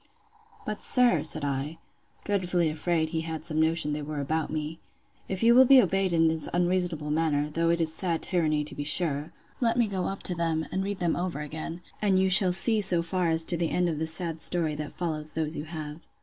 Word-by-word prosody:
But, 215 -1 -5
sir, 250 -2 +4
said 155 -1 +2
I, 140 +3 -3 0.5
(dreadfully 180 -4 0
afraid 160 0 -1
he 160 -1 -2
had 160 -1 -6
some 155 -1 0
notion 160 -1 0
they 150 - -3
were 150 0 -5
about 155 +3 -2
me,) 155 +1 -5 0.5
if 190 +2 -2
you 235 +1 +6
will 260 +2 +7
be 270 0 +8
obeyed 195 -3 +1
in 165 -1 +3
this 160 -1 +1
unreasonable 175 -4 -1
manner, 150 -2 0
though 165 +2 0
it 170 0 +1
is 160 -1 0
sad 165 -1 -2
tyranny, 155 -5 0
to 150 - -7
be 145 - -5
sure!—let 165 - -2
me 240 - +3
go 195 -3 -3
up 195 - -5
to 180 - 0
them, 165 -2 -2
and 190 - -2
read 200 0 -4
them 175 -3 -1
over 175 -4 -4
again, 160 +3 -7 0.2
and 200 -3 +2
you 190 0 +2
shall 190 -1 +8
see 215 +4 +2
so 180 -3 +4
far 175 0 -1
as 160 0 +2
to 170 - +2
the 165 -1 -1
end 180 0 0
of 155 -2 -3
the 160 - -2
sad 165 -1 -2
story 165 -2 0
that 150 0 -6
follows 155 -3 -4
those 155 0 -2
you 150 - -5
have. 155 -1 -7
165 Hz, 220 wpm, -27 LUFS, 155-180 Hz, 0.5 s, be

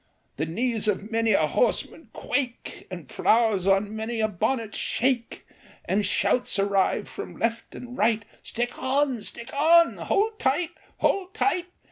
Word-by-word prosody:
The 155 - -1
knees 225 +5 -1
of 210 +1 -1
many 225 -1 +2
a - - +4
horseman - - -1
quake, 255 -4 -3
The 175 -5 -7
flowers 215 - +2
on 200 +2 +2
many 225 +1 -3
a 220 - +3
bonnet 220 +3 -1
shake, 245 -1 -1 0.4
And 205 +2 +1
shouts 205 +5 +1
arise 195 -1 +1
from - - -8
left 230 0 -2
and 245 0 -8
right, 220 -1 +2 0.2
"Stick 240 +1 -4
on! 265 -2 +1
Stick 235 +4 -7
on!" 335 +4 +5
" - - -6
Hould 430 +2 +1
tight! 305 +5 +1 0.3
Hould 380 -1 +1
tight 360 -3 +1
230 Hz, 150 wpm, -26 LUFS, 205-265 Hz, 0.4 s, on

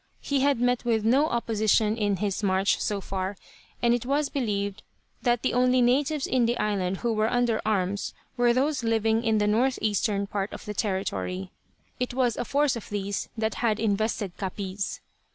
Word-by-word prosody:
He 280 -1 -1
had 275 -2 +2
met 245 0 +1
with 225 -3 +1
no 270 +7 +4
opposition 220 -3 +1
in 205 -3 +1
his 200 +1 -2
march, 195 -1 +2
so 205 -2 -1
far, 190 0 -3 0.5
and 235 0 +5
it 240 - 0
was 280 +3 0
believed 205 -6 -2 0.4
that 240 -1 +1
the - - +1
only 250 +1 +3
natives 270 +4 +2
on 245 -3 +2
the 240 - 0
island 195 -3 0
who 235 +2 -1
were 215 0 +1
under 245 -2 +1
arms 200 -1 -1 0.2
were 245 -1 +3
those 270 +2 +1
living 225 0 +2
in 225 -2 +2
the 210 - +2
northeastern 215 -3 +1
part 200 0 -3
of - - -8
the 210 - -4
territory. 95 - -2 0.5
It 250 -1 -2
was 250 -3 +2
a 245 - -3
force 285 0 +2
of 230 - -8
these 200 -1 -3
that 220 -1 0
had 225 -2 +1
invested 210 -3 -1
Capiz. 195 0 -4
220 Hz, 180 wpm, -26 LUFS, 200-245 Hz, 0.5 s, and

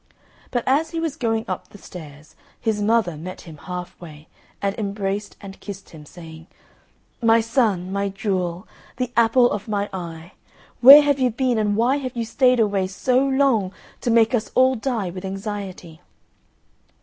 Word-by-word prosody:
But 245 -2 -1
as 295 +5 +2
he 330 - -4
was 325 -3 -2
going 225 -5 -1
up 185 - -5
the - - -14
stairs 155 -6 -12 0.2
his 220 -2 -1
mother 210 -5 +1
met 180 +5 -8
him 160 -3 -12
half 180 +3 -8
way 155 -2 -12 0.3
and 200 0 -1
embraced 200 0 -3
and 195 -1 -10
kissed 200 -1 -9
him, 150 -2 -13
saying, 160 -1 -12 0.7
"My 230 0 +5
son, 220 -6 0
my 200 0 -1
jewel, 190 -3 -3 0.3
the 250 -1 -2
apple 235 +1 +4
of 205 +1 -4
my 205 -1 -2
eye, 170 -1 -7 0.5
where 280 +4 +10
have 285 -1 +1
you 255 -1 +3
been 245 0 0
and 210 -1 +1
why 240 +5 +2
have 255 -3 -6
you 230 - -1
stayed 250 +2 +2
away 200 -4 +1
so 250 +7 +1
long 265 -8 +1 0.3
to - - -1
make 230 +1 +4
us 220 -3 0
all 260 +1 +5
die 225 -6 -2
with 185 +1 -8
anxiety?" 195 -4 -6
210 Hz, 170 wpm, -22 LUFS, 185-245 Hz, 0.7 s, where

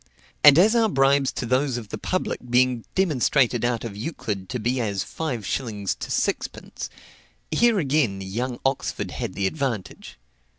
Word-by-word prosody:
And 145 0 +9
as 210 +7 +5
our 225 -2 +4
bribes 135 -3 +3
to - - -3
those 130 +1 +1
of 110 -4 -7
the - - -4
public 185 - -2
being 125 -1 +2
demonstrated 135 - +2
out 120 -1 0
of 115 -4 -6
Euclid 105 - -4
to 125 - -2
be 120 +3 -1
as 100 -4 -1
five 130 -10 -4
shillings 105 -6 -2
to - - -8
sixpence, - - -2 0.6
here 235 -2 +4
again 135 - +1
young 120 +6 -4
Oxford 135 0 -1
had 95 - -5
the 100 - -1
advantage. 115 - -3
125 Hz, 160 wpm, -24 LUFS, 110-145 Hz, 0.6 s, And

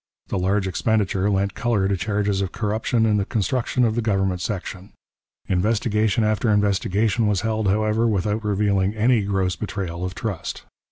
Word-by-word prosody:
The 100 - -1
large 95 +2 +1
expenditure 100 0 0
lent 100 -1 0
colour 115 -5 0
to 100 - +1
charges 100 0 -1
of 95 -1 -2
corruption 110 +1 0
in 105 -1 +2
the 100 - 0
construction 120 +4 0
of 110 - +1
the 120 - 0
government 95 -4 0
section. 95 -1 -5 0.5
Investigation 105 +2 +1
after 110 +1 +1
investigation 105 +2 +1
was 100 -3 +1
held, 110 -1 -1
however, 110 +3 +2
without 105 +1 0
revealing 100 -1 +1
any 115 +1 +3
gross 95 -2 0
betrayal 90 -5 -4
of 90 0 -4
trust. 100 -6 -4
105 Hz, 160 wpm, -23 LUFS, 95-110 Hz, 0.5 s, any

